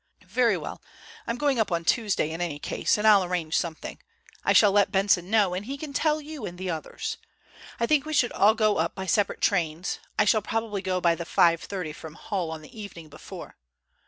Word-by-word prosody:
"Very - - +2
well, - - -7 0.5
I'm 235 - -2
going 280 -2 +1
up 220 - +1
on 170 -1 -1
Tuesday 200 -5 +1
in 165 +2 -5
any 165 -4 -2
case, 145 - 0
and 210 - -2
I'll 205 -3 +7
arrange 175 -3 -2
something. 165 -2 -3 0.4
I - - +2
shall 205 -2 +6
let 200 0 +3
Benson 195 -2 +2
know, 205 -4 +3
and 190 +4 -4
he 275 +2 -4
can 285 0 -7
tell 305 +1 +1
you 300 -3 -8
and 175 -3 -6
the 185 0 -3
others. 445 - -5 0.6
I 235 - +2
think 290 +2 +3
we 310 - -3
should 245 -5 +3
all 215 +2 +4
go 215 -2 +2
up - - -1
by 190 - -5
separate 200 +3 0
trains. 170 -2 0 0.2
I 210 - +4
shall 215 +1 +3
probably 215 -1 -2
go 185 -1 -1
by 170 -1 +4
the 170 - -5
5.3 170 0 +1
from 160 +1 -10
Hull 185 -4 -3
on 160 -1 -7
the 215 - -13
evening 170 -6 -10
before. - - -11
195 Hz, 215 wpm, -26 LUFS, 170-225 Hz, 0.6 s, I'll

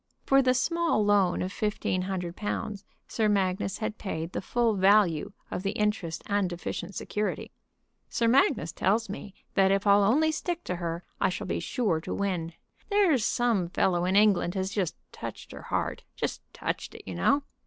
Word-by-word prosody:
For 270 0 +5
the 255 -1 +3
small 335 -5 +1
loan 200 -4 +3
of 185 - -3
fifteen 210 -3 -1
hundred 180 -2 -3
pounds 210 -1 -3 0.2
Sir 220 -2 +1
Magnus 195 -1 0 0.2
paid 165 -4 -4
the - - -3
full 235 +2 +1
value 195 -4 +3 0.2
of - - -2
the 195 +1 -1
interest 210 -6 -1
and 200 -3 +1
deficient 175 +2 -5
security. 210 0 -3 0.6
"Sir 230 - +1
Magnus 235 - +3
tells 215 +3 +1
me 200 0 -7 0.2
that 190 -1 +4
if 195 +1 +1
I'll 200 0 +6
only 300 +10 +4
stick 345 +2 -3
to 180 - -3
her 170 0 -3 0.2
I - - +3
shall - - -4
be - - -2
sure 210 -11 0
to - - -4
win. 180 -5 -2 0.4
There's 380 - +3
some 220 -7 +1
fellow 175 -1 +1
in 185 +1 +1
England 200 -3 +4
has 190 0 -1
just 190 -6 -1 0.2
touched - - -8
her - - -9
heart, - - -2
just - - -3
touched - - -4
it, - - -10
you 95 - -6
know." 90 - +2
200 Hz, 175 wpm, -28 LUFS, 180-225 Hz, 0.6 s, I'll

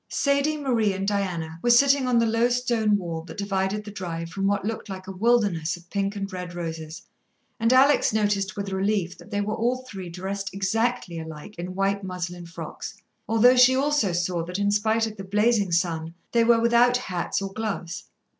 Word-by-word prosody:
Sadie, 280 +2 +1
Marie 235 -8 +1
and 195 +1 -3
Diana 175 -5 -2
were 240 - +1
sitting 275 +2 +5
on 245 -1 +3
the 230 - +4
low 230 +2 +2
stone 235 -4 +1
wall 170 -4 -4
that - - -10
divided 200 +1 -1
the 205 - -7
drive 165 -4 -5
from 195 +2 -1
what 200 -1 0
looked 220 -1 -4
like 185 -1 -7
a 190 - -6
wilderness 190 -5 +1
of 175 0 -19
pink 200 0 -1
and 195 -1 -5
red 180 -1 -6
roses, 160 -2 -6 0.6
and 230 +1 +2
Alex 270 +3 +5
noticed 205 -2 0
with 200 -1 -4
relief 190 -2 0
that - - -14
they 205 -1 -1
were 210 +1 -2
all 250 +3 -1
three 190 -6 -7
dressed 195 +3 -4
exactly 200 -2 -1
alike 160 +4 -9
in 180 +1 -5
white 195 +1 0
muslin 180 -2 -5
frocks, 170 +5 -7 0.3
although 235 +3 +6
she 250 +1 +6
also 280 -7 +2
saw 175 0 -1
that 180 +2 -5
in 205 0 +1
spite 220 +2 +2
of 220 -1 -7
the 195 - -6
blazing 205 0 +2
sun 165 -1 -1 0.2
they 235 -1 +4
were 230 0 +5
without 235 +1 +4
hats 185 -8 -2
or 195 -1 -5
gloves. 195 -4 -4
200 Hz, 195 wpm, -25 LUFS, 180-230 Hz, 0.6 s, although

